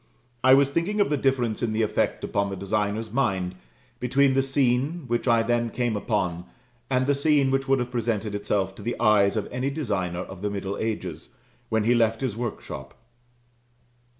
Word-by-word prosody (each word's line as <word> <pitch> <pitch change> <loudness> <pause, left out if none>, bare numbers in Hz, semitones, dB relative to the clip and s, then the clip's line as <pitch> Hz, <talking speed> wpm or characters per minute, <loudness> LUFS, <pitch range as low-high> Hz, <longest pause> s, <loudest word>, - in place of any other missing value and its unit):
I 130 +1 +8
was 140 0 +3
thinking 175 +8 -1
of 200 - +2
the - - +3
difference 130 -5 0
in 115 -3 0
the 110 +1 +1
effect 105 - 0
upon 100 0 0
the 100 - -4
designer's 105 +2 -2
mind, 95 -8 0 0.5
between 135 +2 +3
the 135 - +3
scene 135 +4 +1
which 120 +1 -1
I 115 -1 +4
then 120 0 +1
came 120 -2 -1
upon, 90 -5 -1 0.4
and 130 -1 +2
the 145 - +3
scene 140 -1 +3
which 135 +1 0
would 135 0 +4
have 125 -1 -3
presented 110 -3 -1
itself 100 -2 -1
to - - -9
the 120 +4 -3
eyes 105 -2 +4
of 105 - -2
any 125 +2 -1
designer 100 - -2
of 95 0 -9
the 105 - -1
middle 100 -1 -3
ages, 95 -8 -4 0.3
when 110 -1 +1
he 120 +3 +3
left 115 -2 +2
his 130 -6 -2
workshop. 100 - -6
115 Hz, 185 wpm, -25 LUFS, 100-135 Hz, 0.5 s, I